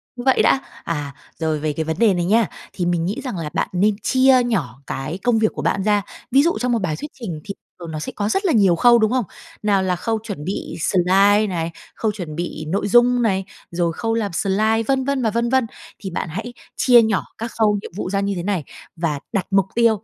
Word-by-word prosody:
như 245 - -6
vậy 265 - +4
đã." 270 - +4 0.2
À, 145 -4 -4 0.2
rồi 160 -2 0
về 150 -1 -1
cái 160 - -2
vấn 160 +1 -2
đề 225 -4 +5
này 175 -1 -1
nha, 220 +3 +3 0.3
thì 180 - -2
mình 175 -1 0
nghĩ 215 +10 -3
rằng 250 -9 -4
là 155 -3 -4
bạn - - 0
nên 200 +3 +2
chia 260 +1 +4
nhỏ 150 - -2
cái 155 +7 -4
công 240 -2 +3
việc 220 -1 +2
của - - -5
bạn 195 - 0
ra. 210 -1 +3 0.3
Ví 275 +3 +5
dụ 335 -5 +1
trong 250 +1 0
một 235 - +2
bài 160 -5 -1
thuyết 295 - -7
trình 175 -10 -5
thì 200 - -6 0.3
thuờng 170 -2 -7
nó 155 - -4
sẽ - - -5
có 205 0 -1
rất 390 - 0
là 345 - +3
nhiều 195 -6 +4
khâu, 240 +5 +6
đúng 220 +1 +2
không? 255 -3 +1 0.4
Nào 200 -2 +2
là 180 -1 +1
khâu 225 +4 -2
chuẩn 205 -9 -6
bị 195 - -4
slide 195 +5 +3
này, 170 -3 -2 0.2
khâu 220 -2 0
chuẩn 175 -7 -7
bị 170 -2 -4
nội 195 +5 -1
dung 245 +3 +4
này, 195 -4 +1 0.3
rồi 170 -1 0
khâu 225 +6 -2
làm 220 -3 -1
slide, 215 +5 +1
vân 270 -1 +2
vân 280 -1 0
và 225 - +2
vân 235 +2 0
vân, 260 -2 +3 0.3
thì 190 - -5
bạn 170 - -3
hãy 220 +9 -5 0.2
chia 245 -2 +6
nhỏ 220 -4 +1
các 230 +1 -5
khâu 210 -2 +3
nhiệm - - -9
vụ 185 - -3
ra 195 0 0
như 200 0 0
thế 175 - -4
này 190 -4 -1 0.3
và 160 -4 -1
đặt 195 -3 0
mục 195 -1 +4
tiêu. 225 -3 +3
205 Hz, 250 wpm, -21 LUFS, 175-230 Hz, 0.4 s, khâu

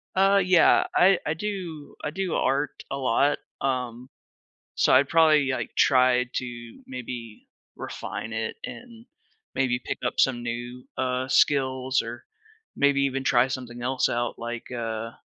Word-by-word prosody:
Uh, 195 +1 +4
yeah. 180 -2 +5
I 185 0 +5
I 155 - 0
do 170 -5 -6
I - - -1
do 190 0 -2
art 140 +1 0
a 135 - -3
lot, 140 +2 +2 0.2
um, 125 -2 -2 0.7
so - - +3
I'd 130 +2 +5
probably, 155 -4 +4
like, 130 - -3
try 125 -1 +4
to 120 -2 -6
maybe 120 -3 -8 0.3
refine 110 - -6
it 110 0 -3
and 235 -1 -10 0.5
maybe 125 -2 +1
pick - - -5
up - - -2
some 120 -3 +2
new, 120 +1 -5
uh, 130 0 -1
skills 130 -2 +2
or 115 +1 -8 0.5
maybe 140 -1 +3
even 135 -1 0
try 125 0 +4
something 120 -3 -6
else 130 +1 +1
out 120 0 -2
like, 120 +1 -6
uh 115 -1 -4
130 Hz, 145 wpm, -25 LUFS, 120-145 Hz, 0.7 s, yeah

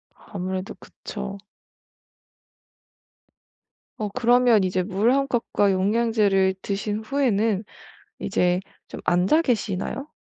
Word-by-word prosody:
아무래도 185 -1 -5
그쵸. 205 -1 -8 2.6
어 210 -1 -3
그러면 245 -1 +4
이제 185 0 0
물 210 +6 +1
1 275 0 +2
컵과 220 -4 +1
영양제를 200 -1 +2
드신 205 +1 -2
후에는 220 -4 0 0.6
이제 180 0 +1 0.3
좀 - - -8
앉아 185 - +3
계시나요? 245 - -2
205 Hz, 195 characters per minute, -24 LUFS, 190-235 Hz, 2.6 s, 그러면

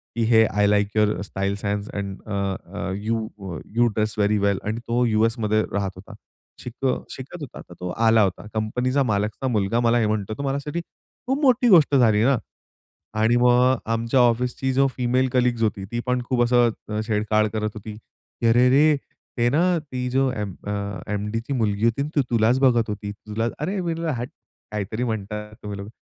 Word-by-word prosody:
"की 120 - -1
हे! 110 -1 +5
I 105 0 +1
like 105 0 +2
your 105 -3 +2
style sense 100 +1 -3
and 100 -1 -5
a, 105 - -4 0.4
a, 95 - -3
you 110 +2 -2 0.5
you 120 +1 +4
dress 110 -1 -1
very 105 +1 +3
वेल 100 -1 +1
आणि 110 +2 -2
तो 120 +1 +1
यूएसमध्ये 110 -1 +1
राहत 100 -1 -1
होता. 95 +4 -12 0.5
शिक 125 +2 -7 0.3
शिकत 140 +6 -8
होता, 140 - -8
तर - - -14
तो 90 - -4 0.2
आला 110 0 +5
होता. 95 +1 -2
कंपनीचा 125 +5 0
मालकचा 105 +2 -1
मुलगा 110 -1 +1
मला 120 0 +3
हे 115 - +2
म्हणतो, 105 0 -2
तर - - -4
माझ्यासाठी 140 +4 -2 0.5
खूप 270 +3 0
मोठी 255 -3 +4
गोष्ट 160 -7 +6
झाली 110 -5 +4
ना 135 +1 +4 0.8
आणि 110 +2 +3
मग 125 +1 +4 0.2
आमच्या 115 +3 +1
ऑफिसची 125 +2 +2
जो 135 +1 +4
फिमेल 125 +1 +1
कलीग्स 125 -2 +2
होती 100 -3 -1
ती 120 - -2
पण 125 -1 0
खूप 125 -2 +2
असं 120 -3 +1
छेडछाढ 110 0 +1
करत 110 -1 -1
होती, 105 0 -8
"की 115 +2 -7
अरे 120 +2 +5
रे! 150 +4 +5 0.4
ते 120 0 +3
ना, 150 +6 +2 0.2
ती 130 -4 -5
जो 135 +1 +2
एम 105 -6 -4
अ, - - -1 0.4
एम-डीची 110 +6 -3
मुलगी 105 -4 0
होती 115 +4 +1
ना 145 - -4
ती 145 - +4
तुलाच 115 +2 +3
बघत 120 -4 +3
होती, 105 0 -4
तुला 105 +2 -4
"अरे 180 +7 -2
मी 170 -2 -1
म्हंटल 165 0 -4
"हाट" 120 +2 -4 0.4
काहीतरी 105 +3 -3
म्हणतात 105 -2 -4
तुम्ही 105 -1 -5
लोक. 100 +1 -7
115 Hz, 185 wpm, -23 LUFS, 105-125 Hz, 0.8 s, गोष्ट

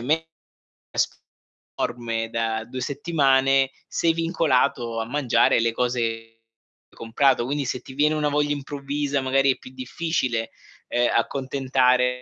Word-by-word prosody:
con 120 - -7
una 160 +1 +4 0.8
spesa - - 0 0.6
enorme 115 -2 -2
da 115 -1 -1
2 130 +1 -6
settimane 135 -3 +2 0.2
sei 165 - +1
vincolato 135 -8 +1
a 110 - -3
mangiare 125 -3 +2
le 115 0 +1
cose 125 +1 -1
che 115 -1 +1 0.8
hai - - -24
comprato. 120 +2 +2
Quindi 140 +2 -1
se 125 - -3
ti 130 - -12
viene 150 +2 +2
una 150 -1 +1
voglia 145 0 +1
improvvisa, 140 0 -2
magari, 135 +1 +3
è - - -22
più 130 - -13
difficile, 130 -3 -2 0.4
uhm, 120 0 +2
accontentare 130 -2 +1
130 Hz, 140 wpm, -24 LUFS, 120-145 Hz, 0.8 s, una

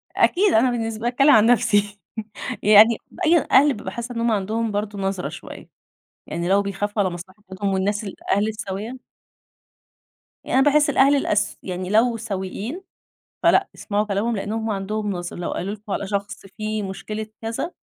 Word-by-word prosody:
أكيد 390 +1 +3
أنا 245 +3 +4
بالنسبة 225 -1 -3
لي - - +3
باتكلّم 275 +4 +4
عن 220 -3 +6
نفْسي 205 -4 +2 0.6
يعني 215 +2 +7
بأين 335 -3 +2
أهل 280 +1 +6
بابقى 210 - -7
حاسّة 235 +1 -6
إن - - -2
هُم 235 -1 +2
عندهم 215 +2 -1
برضه 205 0 -3
نظرة 195 -1 -2
شويّة، - - -10 0.6
يعني 170 +2 -3
لو 200 +1 +4
بيخافوا 205 +1 -2
على 185 - 0
مصلحتهم 190 +2 -6
والناس 205 +3 -1
الأهل 200 +2 -1
السويّة 215 +3 -5 1.5
يعني 265 - +1
أنا 270 - +4
باحس 290 0 +4
الأهل 280 +1 +4
الأس 210 -6 0
يعني 185 0 -4
لو 230 +2 +3
سوييّن 215 - -5 0.6
فلأ - - +4
اسمعوا 210 0 -1
كلامهم 215 +3 -1
لأن 205 +2 -4
هُم 225 0 -2
عندهم 210 +1 -2
نظرة، 175 -2 -5
لو 175 - -4
قالوا 200 +4 -3
لكم 210 -1 -9
على 200 - -2
شخص 200 0 -4
في 215 +1 -4
مشكلة 210 +2 -5 0.2
كذا، 225 +10 -3
210 Hz, 165 wpm, -22 LUFS, 195-230 Hz, 1.5 s, يعني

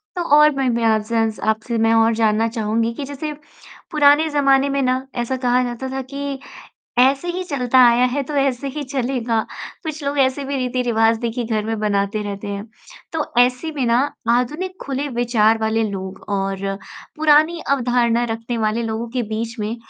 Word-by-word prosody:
तो 355 - -2
और 300 0 +7
मैं 265 -2 +1
मैं 235 0 0
आपसे 220 0 +1
जान 225 -1 +2 0.2
आपसे 220 +2 -1
मैं 225 0 +3
और 225 0 +4
जानना 220 0 +2
चाहूँगी 225 0 -1
कि 280 - -6
जैसे, 285 +2 -5 0.6
पुराने 300 0 +4
ज़माने 275 -1 +3
में 275 0 0
ना, 255 0 0
ऐसा 245 +2 -2
कहा 250 0 +2
जाता 245 +2 -4
था 265 0 -3
कि 280 -1 -4 0.6
ऐसे 270 +7 +3
ही 365 +1 -3
चलता 260 -5 +1
आया 240 +1 +4
है 270 +3 -1
तो 295 +2 -6
ऐसे 275 -1 0
ही 295 +2 -5
चलेगा, 250 -4 -1 0.4
कुछ 310 -2 -5
लोग 280 +1 -2
ऐसे 270 +1 +2
भी 275 +1 -3
रीति-रिवाज़ 240 -3 +1
देखिए 235 0 -2
घर 220 -2 -1
में 225 0 -2
बनाते 205 0 0
रहते 205 0 -6
हैं, 200 0 -4 0.5
तो 320 -2 -1 0.2
ऐसे 250 +6 +2
में 265 - 0
ना 235 +1 +3 0.3
आधुनिक 300 +11 0
खुले 280 +1 -3
विचार 230 -3 +2
वाले 220 +1 +1
लोग 190 -1 -6
और 195 -1 -1 0.6
पुरानी 310 +2 +4
अवधारणा 240 -3 +2
रखने 230 +1 -3
वाले 220 +1 0
लोगों 225 +1 -3
के 250 0 -1
बीच 225 +2 -4
में, 215 +2 -3
245 Hz, 180 wpm, -20 LUFS, 225-275 Hz, 0.6 s, और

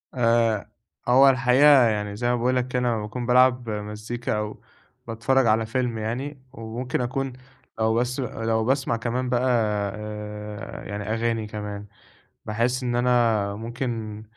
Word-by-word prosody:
آآ، 115 -3 +2 0.4
هو 130 +3 +7
الحقيقة 130 +2 +6
يعني 105 -2 -2
زي 120 +3 -2
ما 125 - +2
باقول 125 +2 +1
لك 125 0 0
كده 125 0 -1
أمّا 120 -3 0
باكون 115 +4 -5
بالعب 125 -1 +4
مزيكا 105 +2 -4
أو 105 0 -5 0.5
باتفرّج 120 +3 +2
على 110 +1 +3
فيلم 120 0 -1
يعني، 130 +6 -4
وممكن 120 +3 -4
أكون 135 +1 -2 0.5
لو 110 0 +2
بس 125 +3 0
لو 115 -3 -1
باسمع 135 -2 +1
كمان 125 +2 -2
بقى 125 0 +1 0.5
آآ، 105 0 -7
يعني 105 0 -5
أغاني 115 -1 -1
كمان، 105 -1 -6 0.6
باحسّ 120 +4 0
إن 120 -1 -1
أنا 115 -5 +2
ممكن 115 -1 -4
115 Hz, 140 wpm, -24 LUFS, 110-125 Hz, 0.6 s, هو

